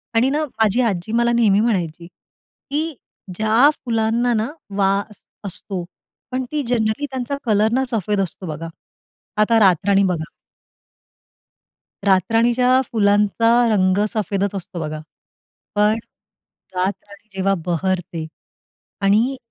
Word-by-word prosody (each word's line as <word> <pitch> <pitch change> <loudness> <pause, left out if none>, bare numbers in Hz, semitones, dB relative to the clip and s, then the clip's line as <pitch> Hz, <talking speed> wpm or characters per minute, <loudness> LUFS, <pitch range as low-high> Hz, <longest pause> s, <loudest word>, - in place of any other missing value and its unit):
आणि 245 +4 +4
ना 300 +2 0
माझी 225 -2 +1
आजी 185 +2 -4
मला 235 +1 +2
नेहमी 215 -4 +3
म्हणायची, 175 -7 -1
की 300 - -7 0.4
ज्या 220 +7 +4 0.2
फुलांना 230 +1 +1
ना 220 +1 0 0.3
वास 200 +1 0 0.2
असतो 190 -1 -5 0.5
पण 255 0 -1
ती 300 -2 -1
जनरली 230 +3 0
त्यांचा 260 +2 -3
कलर 215 0 +3
ना 265 +1 +2
सफेद 210 -2 0
असतो 185 +1 -5
बघा. 160 +2 -5 0.7
आता 225 +1 +4
रातराणी 195 +1 +4
बघा 175 -4 0 1.8
रातराणीच्या 235 +7 +3
फुलांचा 210 +1 +3 0.2
रंग 185 -2 +2
सफेदच 200 -1 -1
असतो 180 -1 -6
बघा. 155 -1 -4 0.8
पण 210 +2 +3 0.8
रातराणी 200 +3 -4
जेव्हा 195 +1 +1
बहरते 175 -2 -2 0.8
आणि 220 +7 +2
210 Hz, 110 wpm, -20 LUFS, 190-235 Hz, 1.8 s, आणि